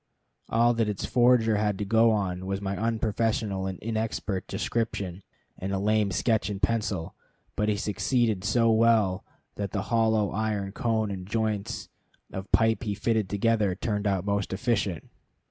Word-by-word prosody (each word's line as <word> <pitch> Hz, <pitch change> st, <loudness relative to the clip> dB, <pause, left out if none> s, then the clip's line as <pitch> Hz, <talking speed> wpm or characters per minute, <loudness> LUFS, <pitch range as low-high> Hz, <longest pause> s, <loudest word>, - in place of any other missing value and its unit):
All 120 Hz, +1 st, +4 dB
that 115 Hz, -2 st, 0 dB
its 105 Hz, -, -3 dB
forger 120 Hz, -3 st, +4 dB
had 105 Hz, -1 st, 0 dB
to 105 Hz, -, -3 dB
go 115 Hz, +3 st, +4 dB
on 95 Hz, -4 st, -1 dB
was 95 Hz, 0 st, -1 dB
my 100 Hz, -1 st, -3 dB
unprofessional 110 Hz, -3 st, -1 dB
and 95 Hz, -1 st, -4 dB
inexpert 110 Hz, -3 st, -2 dB
description, 100 Hz, -5 st, -2 dB, 0.4 s
and 95 Hz, +1 st, -3 dB
a 100 Hz, -, 0 dB
lame 105 Hz, +1 st, +2 dB
sketch 110 Hz, +4 st, +1 dB
in 100 Hz, -2 st, -4 dB
pencil; 100 Hz, -5 st, -1 dB, 0.4 s
but 105 Hz, +1 st, +1 dB
he 105 Hz, -, +1 dB
succeeded 110 Hz, -1 st, 0 dB
so 115 Hz, +2 st, +3 dB
well 110 Hz, -4 st, +3 dB, 0.3 s
that 100 Hz, -2 st, -3 dB
the 100 Hz, -, 0 dB
hollow 110 Hz, -3 st, +2 dB
iron 105 Hz, -2 st, -2 dB
cone 110 Hz, -1 st, 0 dB
and 95 Hz, -2 st, -6 dB
joints 110 Hz, -1 st, -2 dB, 0.5 s
of 95 Hz, +1 st, -6 dB
pipe 110 Hz, +3 st, +3 dB
he 105 Hz, -4 st, -2 dB
fitted 110 Hz, -1 st, 0 dB
together 105 Hz, -2 st, +1 dB
turned 105 Hz, +1 st, -2 dB
out 95 Hz, -2 st, 0 dB
most 100 Hz, -1 st, -1 dB
efficient. 100 Hz, -5 st, -1 dB
105 Hz, 160 wpm, -27 LUFS, 100-115 Hz, 0.5 s, All